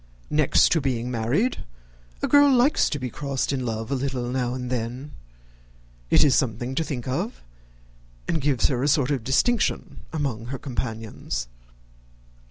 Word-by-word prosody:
Next 150 -2 +4
to 165 - +3
being 125 -3 -1
married, 125 - 0 0.6
a - - +2
girl 285 -1 +6
likes 255 +3 +4
to 150 - -2
be 125 -3 -4
crossed 140 0 -2
in 130 -2 -2
love 115 +2 -3
a - - +2
little 130 -2 -2
now 125 -1 -1
and 125 -1 -5
then. 125 +4 -4 1.0
It - - +6
is 145 -3 +4
something 120 -1 0
to 160 - 0
think 130 -6 -5
of, 95 - -3 0.8
and 160 - 0
gives 135 -3 +1
her 125 -3 -1
a 140 - +1
sort 145 -2 +2
of 135 -5 -1
distinction 210 - +1
among 135 -8 -2
her 135 +2 -4
companions. 110 - -4
130 Hz, 160 wpm, -24 LUFS, 120-145 Hz, 1.0 s, girl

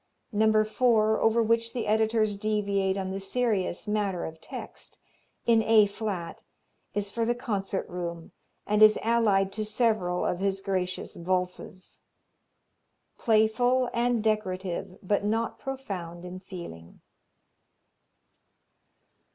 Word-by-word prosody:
No. 215 0 +4
4, 220 -1 +2
over 225 +1 +3
which 230 +1 +1
the 240 - -2
editors 220 0 +2
deviate 200 -2 0
on 190 -1 -3
the 195 - -3
serious 200 -3 -1
matter 205 -4 -1
of 160 0 -8
text, - - -8 0.5
in 230 -1 +5
A 220 -1 +6
flat, 200 -4 -5 0.5
is 205 -1 -1
for 230 +2 -1
the 240 +1 +1
concert 200 -5 -3
room, 170 -2 -6 0.3
and 210 +1 +1
is 215 0 +8
allied 210 -4 +3
to 215 +2 -2
several 215 -5 0
of 180 - -1
his 195 0 0
gracious 185 -2 -3
Valses. 180 +1 -3 1.2
Playful 240 +3 +3
and 235 -1 +1
decorative, 190 -3 -2
but 200 +2 +1
not 225 +2 -1
profound 185 -11 -6
in 180 +1 -7
feeling. 170 - -10
210 Hz, 120 wpm, -28 LUFS, 185-225 Hz, 1.2 s, is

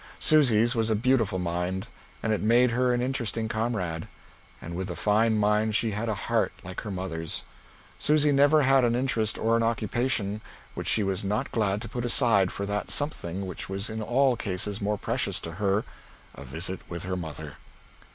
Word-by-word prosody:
Susy's 120 -7 +4
was 115 -2 0
a 110 - +2
beautiful 115 -4 +1
mind, 90 +2 -2 0.4
and 110 - +1
it 105 - -1
made 120 +3 +4
her 125 +1 +2
an 120 0 0
interesting 115 -4 -1
comrade. 110 -8 -2 0.5
And 85 +1 -7
with 95 +1 -3
the 90 - -5
fine 110 +5 +2
mind 105 +1 +2
she 115 0 +2
had 105 +3 -3
a 110 - 0
heart 115 -1 +1
like 95 0 -6
her 110 - -7
mother's. 90 -4 -3 0.6
Susy 150 0 +3
never 145 +2 +5
had 135 0 +4
an 120 -1 +2
interest 115 -4 0
or 115 +1 +1
an 115 - +2
occupation 115 -1 -1 0.3
which - - -5
she 110 - +2
was 95 -1 -2
not 105 +2 -2
glad 105 -2 0
to - - -5
put 120 - -4
aside 115 -6 +3
for 100 - -4
that 100 +1 -3
something 100 - -2
which 90 -1 -5
was 100 +3 -3
in 110 0 -4
all 130 +3 +2
cases 100 0 -2
more 105 +1 0
precious - - -1
to 80 - -4
her 100 +3 0 0.5
a - - -10
visit 85 +8 -2
with 85 -1 -5
her 90 0 -3
mother. 80 -4 -7
105 Hz, 190 wpm, -27 LUFS, 95-120 Hz, 0.6 s, never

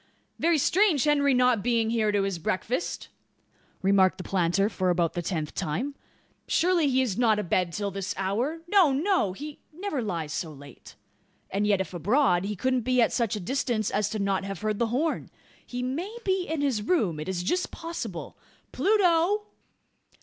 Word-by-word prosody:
"Very 335 0 +3
strange 345 - +3
Henry 285 -2 +3
not 250 -3 +3
being 230 0 +1
here 220 -2 +2
to 205 -1 +1
his 195 -3 -2
breakfast!" 220 - -2 0.7
remarked 190 -1 +4
the 185 - -6
planter, 190 +2 +1
for 185 -4 -1
about 175 -2 +1
the 175 - -2
tenth 160 -3 -3
time. 220 - -2 0.5
"Surely 340 -3 +2
he 260 0 +3
is 230 -4 -2
not 225 -3 +4
abed 180 -3 0
till 200 +3 -3
this 195 +1 -4
hour? 230 - -1
No 365 -6 +5
no 295 - +1
he 295 +7 -8
never 340 -4 -3
lies 165 -8 -3
so 160 -1 -3
late. 140 -2 -13 0.6
And 205 +2 0
yet 200 -2 +3
if 190 - -6
abroad, 180 - +2
he 210 +1 -3
couldn't 255 +5 0
be 255 +2 +1
at 230 - +3
such 230 -5 0
a - - -3
distance 225 +1 -1
as 210 +1 -1
not 195 -1 +1
to 195 - -7
have 195 -1 -6
heard 215 -1 -1
the 235 - +2
horn. 290 +8 -1 0.3
He 245 0 -5
may 340 - -3
be 375 -1 0
in 320 -1 -2
his 265 -7 0
room? 205 - +1
It 155 - -5
is 180 -2 -2
just 360 - 0
possible. 295 - -6 0.3
Pluto!" 390 -1 +3
225 Hz, 180 wpm, -27 LUFS, 190-290 Hz, 0.7 s, No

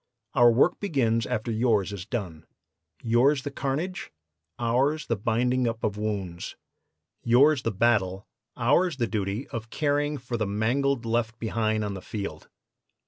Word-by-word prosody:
Our 120 -2 +6
work 120 +4 +3
begins 120 - +1
after 110 +2 -2
yours 110 -3 +1
is 95 -1 -7
done. 90 -10 -5 0.6
Yours 130 +4 +3
the 145 - -4
carnage, 155 +7 -3 0.5
ours 135 +6 +1
the 115 - 0
binding 120 +4 +1
up 115 0 -3
of 105 -2 0
wounds. 100 -5 -4 0.7
Yours 130 +4 +5
the 115 - -1
battle, 100 -2 +1 0.3
ours 145 +7 +2
the 120 - +1
duty 105 +2 -3
of 115 -3 -6
caring 145 +1 0
for 120 -2 -4
the 110 -2 -1
mangled 120 +5 0
left 115 0 -1
behind 110 -1 -1
on 100 - -3
the 95 - -7
field. 100 +1 -6
115 Hz, 145 wpm, -26 LUFS, 110-135 Hz, 0.7 s, Our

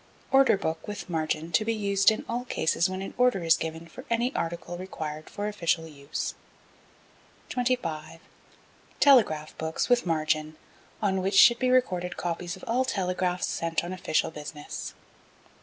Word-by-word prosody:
Order 270 -5 +5
Book 160 -4 -3
with 205 -3 -6
margin 160 0 -1
to 155 - +3
be 225 +1 0
used 200 -2 +3
in 220 - -2
all 240 +1 -2
cases 170 -5 +1
when 185 +1 -4
an - - -7
order 245 -8 +3
is 165 -1 +5
given 160 +1 -5
for 255 +10 -11
any 235 +3 +1
article 170 +1 -3
required 155 -4 -6
for 205 0 -4
official 170 -5 0
use. 140 -2 -5 1.2
25. 170 -12 -2 0.8
Telegraph 205 - +4
Books 160 +7 -2
with 245 -6 +3
margin, 155 -1 0 0.5
on 190 -2 +1
which 195 +1 0
should 235 +3 +8
be 255 - +2
recorded 180 -9 +1
copies 175 0 -3
of - - -15
all 245 +3 +1
telegraphs 180 -6 -1
sent 165 0 -1
on 175 +2 -5
official 180 -3 0
business. 150 -1 -7
180 Hz, 155 wpm, -27 LUFS, 160-215 Hz, 1.2 s, should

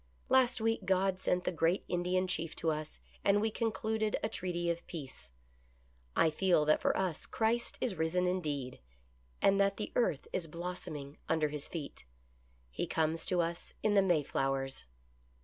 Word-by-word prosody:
Last 255 -2 +4
week 225 +1 +1
God 190 0 +2
sent 180 -1 +1
the - - 0
great 170 +2 +1
Indian 180 +1 +1
Chief 165 -3 -2
to 165 - +1
us, 155 0 -5 0.2
and 200 +1 +4
we 220 +1 +1
concluded 220 -1 0
a 220 - +1
treaty 175 -4 -2
of 170 0 -4
peace. 135 - -7 0.9
I 160 - +4
feel 175 -2 +3
that 155 - +4
for - - +2
us 180 -5 -1
Christ 230 +2 0
is 245 - +1
risen 170 +2 +1
indeed, 150 -8 -2 0.6
and 195 0 +5
that 200 0 +2
the 210 - -4
earth 195 - +1
is 170 -3 -1
blossoming 155 -4 -6
under 160 -2 +2
his 150 -1 -5
feet. 150 - -6 0.7
He - - -2
comes 160 +1 0
to 180 -2 +3
us 170 0 -4
in 215 - +3
the 200 - +6
May 175 -6 +3
flowers." 135 -1 -1
175 Hz, 165 wpm, -33 LUFS, 155-195 Hz, 0.9 s, the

